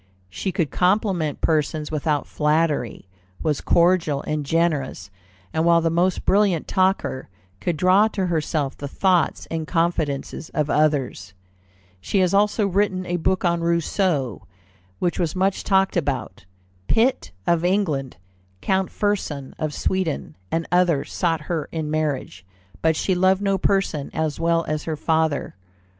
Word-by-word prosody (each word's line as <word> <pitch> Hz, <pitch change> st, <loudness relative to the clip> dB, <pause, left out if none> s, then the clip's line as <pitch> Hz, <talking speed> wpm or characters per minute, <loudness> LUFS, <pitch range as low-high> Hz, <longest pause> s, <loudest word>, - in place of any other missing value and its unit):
She 185 Hz, -, -3 dB
could 170 Hz, -6 st, -1 dB
compliment 180 Hz, -5 st, +1 dB
persons 155 Hz, -1 st, 0 dB
without 150 Hz, -1 st, 0 dB
flattery, 150 Hz, -, 0 dB, 0.4 s
was 150 Hz, -3 st, 0 dB
cordial 170 Hz, -5 st, +2 dB
and 150 Hz, -1 st, -2 dB
generous, 150 Hz, -7 st, -1 dB, 0.4 s
and 160 Hz, -, +1 dB
while 170 Hz, 0 st, +5 dB
the 165 Hz, 0 st, 0 dB
most 180 Hz, +3 st, +1 dB
brilliant 195 Hz, -5 st, +2 dB
talker, 185 Hz, -, 0 dB, 0.3 s
could 170 Hz, -3 st, -2 dB
draw 185 Hz, +6 st, +5 dB
to 200 Hz, -3 st, -2 dB
herself 155 Hz, -4 st, -1 dB
the 145 Hz, -, -6 dB
thoughts 180 Hz, +4 st, +1 dB
and 160 Hz, -1 st, -3 dB
confidences 165 Hz, -3 st, -1 dB
of 150 Hz, -1 st, 0 dB
others. 145 Hz, -9 st, 0 dB, 0.6 s
She 145 Hz, -, -2 dB
had 185 Hz, -1 st, +3 dB
also 210 Hz, +1 st, +3 dB
written 190 Hz, -1 st, 0 dB
a 175 Hz, 0 st, -1 dB
book 185 Hz, +2 st, 0 dB
on 170 Hz, -1 st, +1 dB
Rousseau, 170 Hz, -, 0 dB, 0.5 s
which 175 Hz, +1 st, -1 dB
was 170 Hz, -2 st, -1 dB
much 190 Hz, +1 st, 0 dB
talked 195 Hz, -1 st, +2 dB
about. 140 Hz, -, -2 dB, 0.4 s
Pitt, 235 Hz, -, +2 dB, 0.2 s
of 170 Hz, -1 st, +2 dB
England, 175 Hz, -8 st, 0 dB, 0.4 s
Count 190 Hz, -, 0 dB
Fersen, 175 Hz, -10 st, -2 dB
of 155 Hz, -1 st, -1 dB
Sweden, 160 Hz, -, -2 dB, 0.2 s
and 165 Hz, 0 st, 0 dB
others, 175 Hz, -5 st, +2 dB
sought 165 Hz, -3 st, 0 dB
her 160 Hz, -1 st, -3 dB
in 155 Hz, -2 st, -3 dB
marriage, 145 Hz, -11 st, -2 dB, 0.4 s
but 160 Hz, 0 st, +3 dB
she 190 Hz, -, 0 dB
loved 190 Hz, +2 st, +2 dB
no 195 Hz, -1 st, +1 dB
person 195 Hz, -7 st, 0 dB
as 155 Hz, -1 st, -1 dB
well 165 Hz, 0 st, +1 dB
as 155 Hz, 0 st, -2 dB
her 160 Hz, -2 st, -3 dB
father. 160 Hz, -2 st, 0 dB
165 Hz, 145 wpm, -23 LUFS, 150-185 Hz, 0.6 s, while